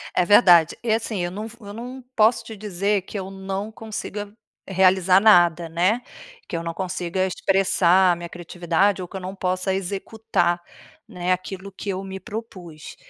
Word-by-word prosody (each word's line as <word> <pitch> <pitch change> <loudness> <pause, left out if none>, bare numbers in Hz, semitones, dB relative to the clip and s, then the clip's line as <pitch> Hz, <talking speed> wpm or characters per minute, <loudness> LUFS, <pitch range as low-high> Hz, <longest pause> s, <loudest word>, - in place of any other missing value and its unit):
é 180 - +3
verdade. 175 -5 +6
E 230 - 0
assim, 220 -2 -2
eu 175 - -3
não 210 +4 -5
v 225 - -12
eu 205 -1 -9
não 250 +4 -8
posso 225 +1 +4
te 225 -1 -9
dizer 200 0 -1
que 205 - -7
eu 190 0 -5
não 195 +2 -5
consiga 210 -2 -6 0.3
realizar 190 -1 +4
nada 175 -5 +5
né. 185 +9 +1 0.5
Que - - -4
eu 165 - -4
não 165 0 -4
consiga 185 0 -2
expressar 190 -1 +3
a - - +1
minha 170 0 -8
criatividade 175 +3 0
ou 180 - -6
que - - -13
eu - - -7
não 185 +1 -6
possa 185 0 -1
executar 195 -2 -1 0.5
né, 180 0 -3
aquilo 190 +2 -3
que 200 +2 -7
eu 190 0 -3
me 190 0 -7
propus. 190 -8 -9
190 Hz, 180 wpm, -23 LUFS, 180-205 Hz, 0.5 s, verdade